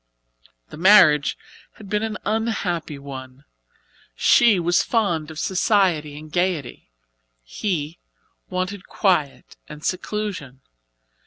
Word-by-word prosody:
The - - -10
marriage 170 -5 +5 0.4
had 210 - -13
been 210 +1 -1
an 220 -1 -3
unhappy 200 -9 -2
one. 135 -1 -10 0.7
She 220 - +5
was 175 +1 +2
fond 175 -10 0
of 160 - -10
society 180 -6 +1
and 155 0 -11
gaiety, 175 - -2 0.5
he 155 - -4 0.5
wanted 185 +1 -4
quiet 175 -9 -1
and 150 0 -10
seclusion. 185 -9 -4
175 Hz, 100 wpm, -22 LUFS, 150-205 Hz, 0.7 s, marriage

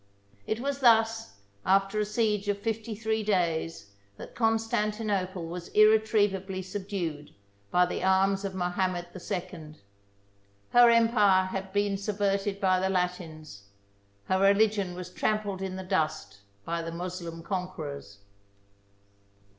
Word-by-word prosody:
It 220 - -1
was 280 +2 -2
thus, 225 - +3 0.3
after 195 +2 +2
a 210 - +1
siege 210 -1 0
of 205 -1 0
fifty 220 +1 -3
three 220 +1 -1
days, 165 - -1 0.3
that - - -10
Constantinople 210 -5 -1
was 170 +1 -7
irretrievably 210 -3 +3
subdued 185 -6 -5 0.3
by 180 0 +4
the 180 - -4
arms 195 +1 +2
of 195 -1 -4
Mohamed 180 -1 -1
II. 175 -4 -6 1.0
Her 240 0 +7
empire 225 -5 +4
only 185 0 -5
had 195 0 -4
been 205 0 0
subverted 200 -1 -1
by 185 -2 +3
the 190 +1 0
Latins; 165 - -3 0.6
her 185 - +1
religion 200 -1 +3
was 180 0 -7
trampled 205 -1 -1
in 190 -1 -4
the 190 - -5
dust 155 - -2 0.3
by 170 0 -2
the 165 0 -5
Moslem 170 -1 -6
conquerors. 155 - -5
190 Hz, 125 wpm, -28 LUFS, 180-210 Hz, 1.0 s, Her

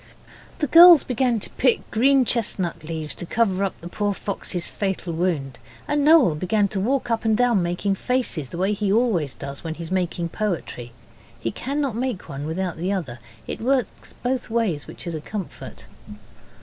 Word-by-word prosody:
The 300 - 0
girls 335 +2 +9
began 250 -2 0
to - - -6
pick 250 -2 +2
green 265 +3 +4
chestnut 205 -9 0
leaves 155 -1 -5
to - - -6
cover 200 -3 +1
up 195 - -3
the 170 - -7
poor 205 +2 -1
fox's 185 -3 -4
fatal 190 -4 -3
wound, 160 -7 -2 0.3
and 290 0 +1
Noel 300 - +6
began 200 +6 +1
to 195 - -3
walk 245 +4 0
up 230 - 0
and 220 -1 +2
down 240 -5 +3
making 175 +3 -1
faces, 195 - -2
the - - -7
way 190 +3 +1
he 205 -1 -1
always 195 - +1
does 140 +3 -8
when 160 -1 -4
he's 165 +1 -8
making 175 -2 -1
poetry. 165 - -4 0.5
He 115 0 -2
cannot 275 - -2
make 245 -5 -3
one 145 0 -5
without 175 +1 -3
the 180 +4 -2
other. 145 -12 -3 0.3
It - - -6
works 255 +1 -1
both 250 0 -1
ways, 220 -11 -1
which - - -9
is 170 - -4
a 155 - -4
comfort. 200 +2 -7
195 Hz, 180 wpm, -23 LUFS, 170-240 Hz, 0.5 s, girls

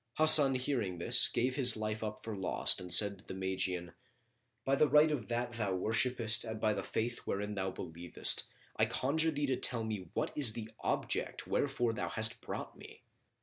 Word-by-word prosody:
Hasan 155 -3 +10
hearing 125 -8 -3
this 85 - +3
gave 125 +1 -2
his 125 -4 +4
life 110 0 -5
up 105 0 -6
for 110 -2 -6
lost 95 -1 0
and 90 -1 -9
said 100 -1 +3
to - - -18
the - - -10
Magian, 95 -2 -3 0.7
"By 135 - +1
the 150 +1 +1
right 150 +3 +4
of 130 -7 -5
that 120 0 -4
thou 110 -5 -3
worshippest 110 +2 0
and 110 -1 -7
by 110 -1 0
the - - -5
faith 115 +1 -4
wherein 105 +1 -5
thou 95 -1 -4
believest, 85 -1 0 0.3
I - - +2
conjure 160 +5 -1
thee 145 -2 -3
to 130 -2 -2
tell 120 -3 +1
me 105 -6 -6
what - - -3
is 130 -7 +1
the 110 -1 -9
object - - -4
wherefor 120 -5 -2
thou - - -5
hast 115 +2 -3
brought - - -8
me!" - - -15
110 Hz, 190 wpm, -31 LUFS, 100-130 Hz, 0.7 s, Hasan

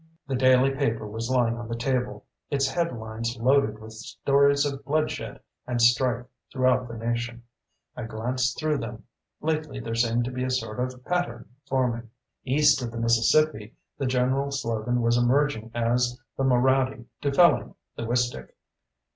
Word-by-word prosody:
The 135 - -4
daily 130 +1 +4
paper 135 -6 -1
was 115 +3 -4
lying 120 -3 +2
on 120 - -6
the 115 - -3
table, 120 -4 -2 0.2
its 135 -1 +1
headlines 115 -7 -3
loaded 125 -3 +3
with 110 0 -11
stories 140 +5 +2
of 140 -1 -4
bloodshed 155 +3 -2 0.3
and 125 -1 -1
strife 120 +1 +3 0.3
throughout 130 -1 +2
the 115 -1 -7
nation. 120 +1 -3 0.5
I 120 - -5
glanced 125 +4 -1
through 155 -2 0
them. 115 -1 -7 0.4
Lately, 155 -3 -2
there 115 -2 -5
seemed 115 +1 +1
to 125 - -4
be 125 0 -3
a 130 - -1
sort 125 -3 -2
of 125 0 -4
pattern 175 -10 -2 0.2
forming. 120 -3 -1 0.4
East 145 +1 +4
of 120 - -3
the 115 - -8
Mississippi, 115 +1 +2 0.2
the 135 - 0
general 130 +2 +1
slogan 120 -2 -1
was 115 +1 +3
emerging 120 -2 +1
as 120 +1 +1 0.2
the 135 - -1
Moraddy 130 0 +2 0.2
dufelling 145 +5 +3 0.2
the 115 - -5
Wistick. 120 +1 -1
125 Hz, 155 wpm, -26 LUFS, 115-135 Hz, 0.5 s, daily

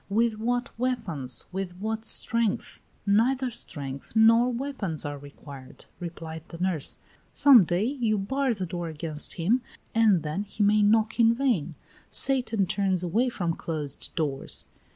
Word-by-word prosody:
"With 220 +1 +1
what 245 +2 -1
weapons? 180 - -1
With 185 -1 -4
what 220 +3 -3
strength?" 230 -2 +1 0.2
"Neither 245 +5 +2
strength 140 - -8
nor 230 +3 +5
weapons 235 - -3
are 145 -1 -4
required," 140 -1 -12
replied 165 -2 -7
the 165 - -9
nurse. 175 -4 -1 0.4
"Some 270 -9 +7
day 175 +4 0
you 235 -5 0
bar 260 +5 0
the 190 -2 -3
door 175 -1 -4
against 155 -1 -2
him, 210 +10 +1 0.3
and 215 -7 +4
then 155 +5 -2
he 205 +1 -2
may 210 +1 +4
knock 220 +2 +3
in 230 0 +5
vain. 225 - 0 0.3
Satan 245 -7 +2
turns 190 -1 0
away 220 +9 +1
from 175 -8 -2
closed 150 -4 -4
doors." 145 -5 -3
200 Hz, 145 wpm, -27 LUFS, 165-230 Hz, 0.4 s, Some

